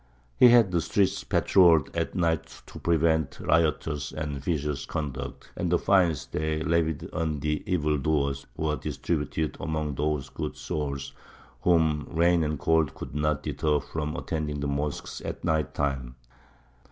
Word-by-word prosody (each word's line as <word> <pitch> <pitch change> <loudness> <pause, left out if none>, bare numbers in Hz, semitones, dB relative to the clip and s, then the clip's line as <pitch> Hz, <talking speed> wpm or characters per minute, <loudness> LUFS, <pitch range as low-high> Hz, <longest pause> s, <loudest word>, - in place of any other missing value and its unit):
He 125 - +8
had 120 -5 +6
the 85 -2 +2
streets 95 +4 +1
patrolled 85 -6 +4
at - - -2
night 80 -3 -1
to - - -11
prevent 80 -2 +1
riotous 75 -3 +1
and 75 -3 -4
vicious 75 -3 -2
conduct; 70 -4 -5
and 85 -1 -2
the 90 - +5
fines 90 -7 +2
they 80 0 -2
levied 80 -2 0
on 80 -3 -1
the 75 +1 -1
evildoers 75 -3 0
were 75 -1 0
distributed 80 -1 -2
among 80 -2 -2
those 75 0 -1
good - - -5
souls 70 -2 -4 0.5
whom 80 -4 +2
rain 85 +1 +3
and 75 0 -1
cold 80 -2 +2
could - - -8
not 75 -1 0
deter 75 -1 0
from 75 +1 -4
attending 75 -3 -3
the 70 - -2
mosques 70 +1 -3
at - - -5
night 80 -3 0
time. 65 -4 -2
75 Hz, 145 wpm, -27 LUFS, 75-80 Hz, 0.5 s, He